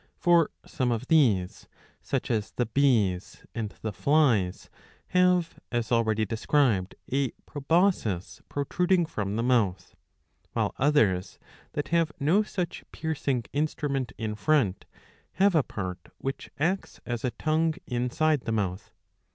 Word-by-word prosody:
For 170 -2 +4 0.2
some 125 -2 -1
of 120 +2 -3
these, 110 - +2 0.3
such - - -2
as 110 -3 -1
the 120 - 0
Bees 110 -8 +1
and 110 -3 -3
the 110 -2 -2
Flies, 110 - +2 0.4
have, 180 -2 +2
as 120 -1 -1
already 110 -2 +2
described, 110 -3 +1 0.2
a 135 0 +1 0.2
proboscis 145 - 0
protruding 175 +5 +1
from 105 -9 -3
the 115 - 0
mouth;''' 115 -7 +1 0.6
while - - 0
others, 110 -11 +2 0.4
that 145 - -3
have 165 -2 +2
no 160 +9 +3
such 180 -5 -4
piercing 140 -6 -2
instrument 145 -3 -1
in 110 -1 -3
front, 105 -3 +1 0.5
have 195 0 +3
a 160 - +5
part 95 -7 -5 0.2
which 135 0 -5
acts 180 +7 -1
as 120 -2 -3
a 130 - +1
tongue 155 +6 0
inside 130 +5 +1
the 115 - -1
mbuth. 100 -3 -2
130 Hz, 130 wpm, -27 LUFS, 110-155 Hz, 0.6 s, a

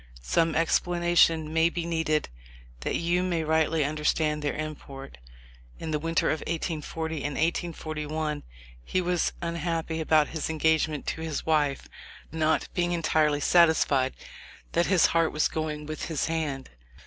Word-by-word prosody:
Some 165 - +1
explanation 165 -1 +2
may 160 +1 +4
be 170 0 -4
needed 160 -2 0 0.5
that - - -2
you 175 +1 +1
may 175 -3 0
rightly 160 -1 +2
understand 150 0 0
their 145 - -1
import. 140 - -7 0.6
In 160 - -5
the 150 - 0
winter 165 +1 +1
of 155 - -1
1840 160 0 -3
and 145 -1 -3
1841, 155 -2 -2 0.4
he 185 - -1
was 180 -1 0
unhappy 165 -1 -2
about 155 -1 +3
his 160 -1 -3
engagement 160 -1 +1
to 160 - -3
his 160 -2 -3
wife 150 -3 +1 0.3
— - - -19
not 160 0 +1
being 175 -1 0
entirely 155 -3 +2
satisfied 155 -6 +4 0.6
that 170 +1 +2
his 185 -3 +4
heart 165 -1 +2
was 150 - +2
going 155 -1 -4
with 155 +1 -5
his 160 -3 -1
hand. 155 -5 -3
160 Hz, 145 wpm, -27 LUFS, 150-165 Hz, 0.6 s, may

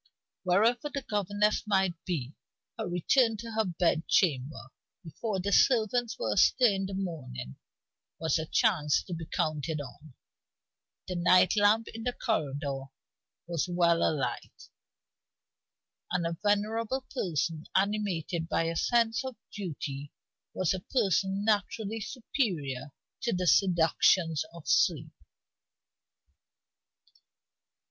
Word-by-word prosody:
Wherever 225 +9 +2
the 280 -2 -4
governess 205 +1 +1
might 190 -3 +2
be, 145 -7 -3 0.4
her - - -4
return 220 +7 +2
to 230 +2 -7
her 220 0 0
bed 170 -2 0
chamber, 135 - +1 0.3
before 190 +5 -4
the 200 +2 -2
servants 235 0 +3
were 110 - -1
astir 240 - +4
in 195 0 -2
the 195 - -5
morning, 130 - -5 0.6
was 160 0 +1
a 160 - -4
chance 150 -4 +2
to 180 - -7
be 165 -1 -6
counted 155 0 -2
on. 145 +1 -10 0.9
The 180 - -3
night 180 +3 +5
lamp 210 +2 +3
in 225 - -8
the 245 +2 -2
corridor 140 - -2 0.6
was 170 0 -2
well 170 -1 +3
alight; 150 -4 -2 1.4
and 175 -2 0
a 165 0 -2
venerable 220 +5 0
person, 165 - -2
animated 190 -4 0
by - - +1
a 165 0 -2
sense 230 +4 +2
of 260 -2 -5 0.2
duty, 145 -7 -5 0.4
was 185 -2 +1
a 185 - -3
person 195 - 0
naturally 215 +1 0
superior 165 - -3 0.3
to 235 - 0
the 180 0 -1
seductions 165 -1 +3
of 170 -2 -12
sleep. - - +2
185 Hz, 120 wpm, -29 LUFS, 160-215 Hz, 1.4 s, night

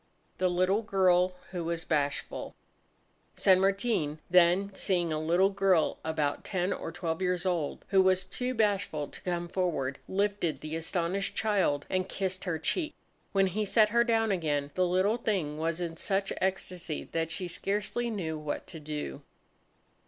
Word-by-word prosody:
The 185 - +3
Little 185 +4 +2
Girl 185 -3 +3 0.2
Who 175 -2 -3
Was 170 0 -2
Bashful 145 -2 -1 0.8
San 185 -1 +5
Martin 195 -6 +1
then 180 +3 +5
seeing 175 -4 0
a 155 - -1
little 175 +5 +3
girl 195 -4 +2
about 155 -2 -1
ten 185 -1 -1
or - - -5
twelve 165 0 -3
years 180 -1 0
old, 170 -6 -1
who 195 -1 +5
was 185 0 +3
too 250 +7 -2
bashful 200 -9 0
to - - -9
come 175 -1 -2
forward, 165 -8 -1
lifted 200 -4 0
the 155 +1 -4
astonished 170 +4 -1
child 190 -10 +1
and 185 0 -1
kissed 190 -1 -3
her 170 -3 -1
cheek. 310 - -1 0.4
When 195 -1 +3
he 195 +3 -1
set 210 +1 +4
her 235 +2 +4
down 225 -2 +2
again, 145 -6 0
the 185 -1 +2
little 190 +5 +2
thing 185 -10 -1
was 165 +1 -1
in 170 -2 -3
such 195 +1 0
ecstasy 185 -4 -2
that 165 -1 -1
she 180 +3 -3
scarcely 205 +6 -1
knew 165 -8 -3
what 150 -1 -4
to 165 - -9
do. 150 - -5
180 Hz, 160 wpm, -30 LUFS, 165-195 Hz, 0.8 s, San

